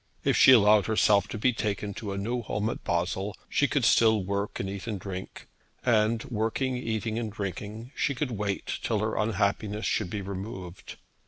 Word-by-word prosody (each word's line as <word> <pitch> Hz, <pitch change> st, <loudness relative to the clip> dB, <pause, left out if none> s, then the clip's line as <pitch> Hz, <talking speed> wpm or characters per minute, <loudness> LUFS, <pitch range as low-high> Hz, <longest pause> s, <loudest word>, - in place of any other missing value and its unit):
If -, -, +2 dB
she -, -, +8 dB
allowed 105 Hz, -4 st, +6 dB
herself 105 Hz, -2 st, +3 dB
to 110 Hz, -, -5 dB
be 125 Hz, +4 st, +2 dB
taken 105 Hz, -2 st, -2 dB
to 105 Hz, 0 st, -5 dB
a 100 Hz, -, -4 dB
new 120 Hz, +5 st, -2 dB
home 105 Hz, 0 st, -2 dB
at -, -, -8 dB
Basle 95 Hz, +4 st, -1 dB
she 145 Hz, -, +2 dB
could 135 Hz, -3 st, +1 dB
still 110 Hz, -4 st, +4 dB
work 100 Hz, +2 st, -3 dB
and 95 Hz, -, -2 dB
eat 100 Hz, +2 st, -6 dB
and 105 Hz, -4 st, -3 dB
drink, 95 Hz, 0 st, -7 dB, 0.4 s
and 110 Hz, -1 st, +3 dB
working, 120 Hz, +3 st, -1 dB
eating, 110 Hz, -2 st, -2 dB
and 110 Hz, -2 st, -3 dB
drinking 105 Hz, +4 st, -6 dB
she 140 Hz, -, 0 dB
could 125 Hz, +1 st, -2 dB
wait 105 Hz, -3 st, -3 dB
till 110 Hz, -, 0 dB
her 110 Hz, +1 st, -1 dB
unhappiness 105 Hz, 0 st, 0 dB
should 100 Hz, -5 st, 0 dB
be 100 Hz, +1 st, -4 dB
removed. 95 Hz, -2 st, -7 dB
105 Hz, 185 wpm, -28 LUFS, 100-115 Hz, 0.4 s, she